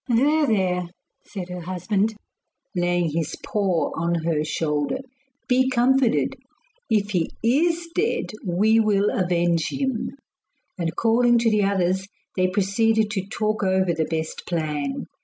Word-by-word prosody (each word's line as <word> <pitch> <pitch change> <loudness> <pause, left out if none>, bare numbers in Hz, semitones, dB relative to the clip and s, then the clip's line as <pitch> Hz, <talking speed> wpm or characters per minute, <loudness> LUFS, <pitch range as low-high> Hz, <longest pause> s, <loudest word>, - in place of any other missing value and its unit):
'There! 290 +6 +3
there!' 180 -5 +1 0.3
said 185 -3 -7
her 180 0 -5
husband, 195 +5 -1 0.6
laying 175 -2 +1
his 160 0 -2
paw 195 -5 0
on 170 +1 0
her 160 -2 +1
shoulder. 150 - -1 0.5
'Be 260 0 +3
comforted; 260 0 +2 0.5
if 210 -2 +1
he 175 -4 0
IS 330 +8 +2
dead, 410 +7 0
we 210 +5 +3
will 210 -2 +2
avenge 175 -3 +1
him.' 265 -4 -2 0.7
And 165 -2 -3
calling 240 +2 +3
to 230 -1 +2
the 210 -1 +3
others 190 -1 +1 0.3
they 185 -1 +2
proceeded 210 +3 +1
to 195 -3 -3
talk 215 +1 -1
over 190 -2 +2
the 160 -1 0
best 160 0 -4
plan. 150 -5 -2
195 Hz, 135 wpm, -23 LUFS, 175-225 Hz, 0.7 s, There